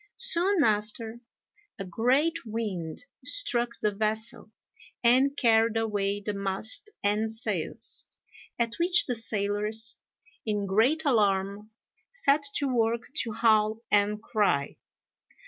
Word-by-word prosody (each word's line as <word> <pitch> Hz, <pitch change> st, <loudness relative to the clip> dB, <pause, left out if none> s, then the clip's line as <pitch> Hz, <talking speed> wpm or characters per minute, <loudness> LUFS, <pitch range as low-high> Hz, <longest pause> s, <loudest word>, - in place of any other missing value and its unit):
Soon 390 Hz, -7 st, +6 dB
after, 220 Hz, +1 st, -2 dB, 0.6 s
a 195 Hz, -, -6 dB
great 255 Hz, -, 0 dB
wind 210 Hz, -, -5 dB, 0.2 s
struck 245 Hz, -, +1 dB
the 210 Hz, -, +2 dB
vessel, 215 Hz, +2 st, -3 dB, 0.5 s
and 260 Hz, +4 st, +3 dB
carried 225 Hz, -2 st, +2 dB
away 205 Hz, -2 st, -1 dB
the 210 Hz, +1 st, -4 dB
mast 200 Hz, -, -1 dB
and 210 Hz, +2 st, 0 dB
sails; 225 Hz, +2 st, -2 dB, 0.5 s
at 235 Hz, -1 st, -1 dB
which 350 Hz, +1 st, +3 dB
the 250 Hz, -, -2 dB
sailors, 215 Hz, 0 st, -1 dB, 0.5 s
in 210 Hz, -2 st, -2 dB
great 240 Hz, +12 st, +1 dB
alarm, 205 Hz, -4 st, 0 dB, 0.4 s
set 305 Hz, -12 st, +1 dB
to 285 Hz, -, +1 dB
work 235 Hz, -1 st, -1 dB
to 230 Hz, -, -5 dB
howl 215 Hz, -1 st, +2 dB
and 210 Hz, +1 st, +1 dB
cry. 200 Hz, -13 st, 0 dB
220 Hz, 110 wpm, -27 LUFS, 205-245 Hz, 0.6 s, Soon